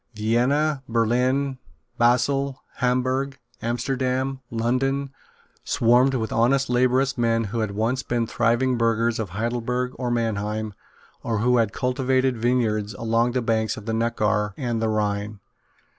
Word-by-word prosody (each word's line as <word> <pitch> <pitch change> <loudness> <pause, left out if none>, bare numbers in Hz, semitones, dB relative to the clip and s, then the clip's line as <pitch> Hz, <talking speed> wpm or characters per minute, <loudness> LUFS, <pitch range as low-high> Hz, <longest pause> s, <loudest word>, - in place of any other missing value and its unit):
Vienna, 130 +7 +1
Berlin, 125 +4 +1 0.4
Basle, 130 +3 +2 0.2
Hamburg, 130 +2 0 0.2
Amsterdam, 130 +2 -1
London, 135 +4 0 0.5
swarmed 125 +3 +3
with 110 -3 -2
honest 130 +3 +2
laborious 130 +2 +2
men 115 -1 +2
who 110 +2 -3
had 110 -2 0
once 115 +5 0
been 120 -2 -1
thriving 120 +2 +1
burghers 115 0 +1
of 110 -4 -3
Heidelberg 120 +5 -2
or 125 -2 -1
Mannheim, 110 -2 -2 0.5
or 115 -2 -1
who 125 +3 +3
had 115 -3 +2
cultivated 130 +1 0
vineyards 110 -3 0
along 115 +2 +1
the 125 -2 0
banks 110 -1 0
of 110 - -9
the 115 - -2
Neckar 105 -3 0
and 120 -4 -2
the 110 - +1
Rhine. 105 -1 -1
120 Hz, 130 wpm, -24 LUFS, 110-130 Hz, 0.5 s, swarmed